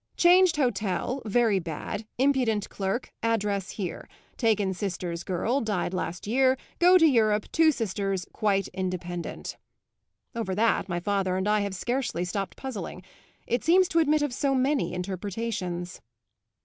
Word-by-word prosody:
'Changed 360 0 +6
hotel, 245 -1 -1
very 220 -2 +3
bad, 175 +5 -5
impudent 250 -6 +2
clerk, 195 +5 -3
address 210 -4 0
here. 190 -5 -5 0.3
Taken 210 -5 +1
sister's 175 -3 -4
girl, 225 +9 0
died 205 -5 -1
last 180 -1 -3
year, 260 +4 +3 0.2
go 360 +1 +7
to 325 - +5
Europe, 215 -7 +3
two 320 -1 +5
sisters, 195 -6 -2
quite 200 -2 +1
independent.' 180 -2 -4 0.8
Over 220 -5 -2
that 215 -2 +1
my 175 0 -1
father 190 0 0
and 190 +2 -1
I 210 0 +3
have 200 -2 -2
scarcely 240 -4 -2
stopped 195 +2 -4
puzzling; 205 -8 -6 0.4
it 240 +1 -1
seems 365 +3 +5
to 335 - +2
admit 305 -1 +3
of 290 -4 -1
so 270 +1 +1
many 260 -7 +1
interpretations." 185 -1 -4
210 Hz, 140 wpm, -27 LUFS, 185-255 Hz, 0.8 s, go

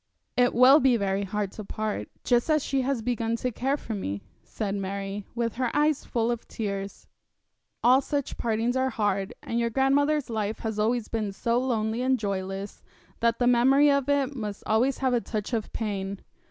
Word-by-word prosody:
'It 245 0 +4
will 255 +5 +8
be 255 -3 +4
very 200 -1 0
hard 200 0 -2
to 215 - -8
part, 215 +1 -3
just 240 +3 +2
as 305 -2 +3
she 270 -1 0
has 255 -3 -1
begun 230 -1 0
to 250 +2 -2
care 270 +5 0
for 225 - -6
me,' 100 - -4 0.2
said 205 -3 -4
Mary, 195 0 -4
with 230 -2 -1
her 250 -2 +1
eyes 300 -1 +2
full 235 -1 0
of 235 -1 -4
tears. 200 -2 -5 0.8
'All 255 +3 +6
such 285 0 -3
partings 230 +2 0
are 260 0 +2
hard, 200 -4 -1
and 235 - -2
your 235 0 +1
grandmother's 280 +4 +2
life 215 -1 -2
has 220 -2 -3 0.3
been 215 -3 -2
so 235 +4 0
lonely 230 -2 -1
and 260 0 +2
joyless 195 -1 -4 0.4
that 230 0 +2
the 245 - +1
memory 265 +4 +5
of 280 -1 +1
it 280 -1 +1
must 210 -4 -5
always 245 +5 +2
have 260 -2 +1
a 240 - +2
touch 215 +2 -4
of 220 -2 -2
pain. 200 -3 -3
230 Hz, 185 wpm, -27 LUFS, 205-260 Hz, 0.8 s, will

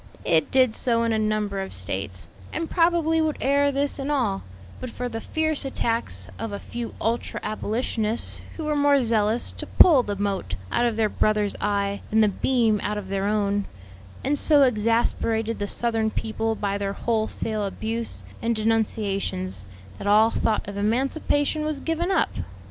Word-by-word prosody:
"It 160 -2 +3
did 255 -4 +4
so 230 -1 +1
in 230 -1 +1
a 220 - +1
number 215 -2 0
of 190 - -6
States, 95 0 -4 0.2
and 330 - -3
probably 330 -2 +3
would 315 -1 0
ere 280 +1 +3
this 280 +1 0
in 275 +1 -3
all, 235 -10 0 0.4
but 255 - -5
for 250 +1 -4
the 225 -2 -5
fierce 315 -1 -1
attacks 230 - -2
of 225 - -4
a 200 - -3
few 235 +2 -6
ultra 230 +1 -1
abolitionists, 220 +1 -2 0.2
who 325 - -4
were 305 0 0
more 285 -2 +4
zealous 220 0 +1
to - - -7
pull 310 -8 +7
the 205 -4 -3
mote 195 - -2 0.2
out 240 - +2
of 230 - -1
their 220 -1 +2
brother's 210 -1 +1
eye 200 -1 0
than 220 +1 +3
the 215 - +5
beam 225 0 +2
out 210 +1 -2
of 195 -2 -6
their 195 0 -1
own, 205 -1 +1 0.6
and 290 0 +1
so 295 -3 +5
exasperated 230 -1 +1
the 205 - -2
Southern 225 0 0
people 225 0 -2
by 200 -1 -2
their 200 0 -2
wholesale 220 -1 -1
abuse 225 +3 -4 0.2
and 230 0 +1
denunciations, 200 - -1 0.3
that - - -5
all 215 +2 +5
thought 220 -3 0
of 200 0 -6
emancipation 275 +7 0
was 305 -2 -2
given 330 +4 -1
up. 385 - +2
225 Hz, 170 wpm, -24 LUFS, 205-260 Hz, 0.6 s, pull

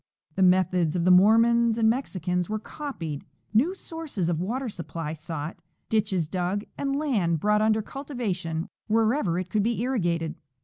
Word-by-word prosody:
The 190 - -2
methods 180 -3 +3
of 170 -1 0
the 185 - +6
Mormons 230 +4 +5
and 225 -1 +3
Mex 250 +5 0
icans 180 0 -1
were 215 - -1
copied, 210 - -6 0.3
new 295 - +3
sources 320 - -4
of 165 -2 0
water 245 +8 -2
supply 165 -5 -5
sought, 155 +1 -6 0.3
ditches 200 -7 +1
dug, 185 +4 -1
and 275 0 -1
land 210 - +1
brought 210 +4 +2
under 215 0 +2
cultivation 195 - -4 0.2
wherever 220 - +2
it 185 0 -4
could 215 - +2
be 230 +2 0
irrigated. 175 -10 0
200 Hz, 160 wpm, -26 LUFS, 170-235 Hz, 0.3 s, the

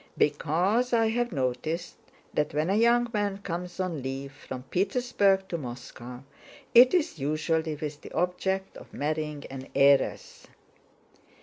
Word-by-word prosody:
"Because 185 - +1
I 225 -1 +4
have 240 +2 0
noticed 155 +4 -2 0.4
that 150 -1 0
when 155 +5 +1
a - - +2
young 235 +2 +4
man 205 -2 0
comes 180 -2 -5
on 180 -6 -2
leave 135 +1 -5
from 130 -2 -8
Petersburg 195 - +1
to 170 - -2
Moscow 125 -1 -8 0.5
it 250 +6 +8
is 330 - 0
usually 155 +2 0
with 150 -1 -6
the - - -11
object 190 +3 -1
of - - -13
marrying 150 0 -2
an 135 0 -7
heiress." 140 0 +2
165 Hz, 135 wpm, -28 LUFS, 145-200 Hz, 0.5 s, it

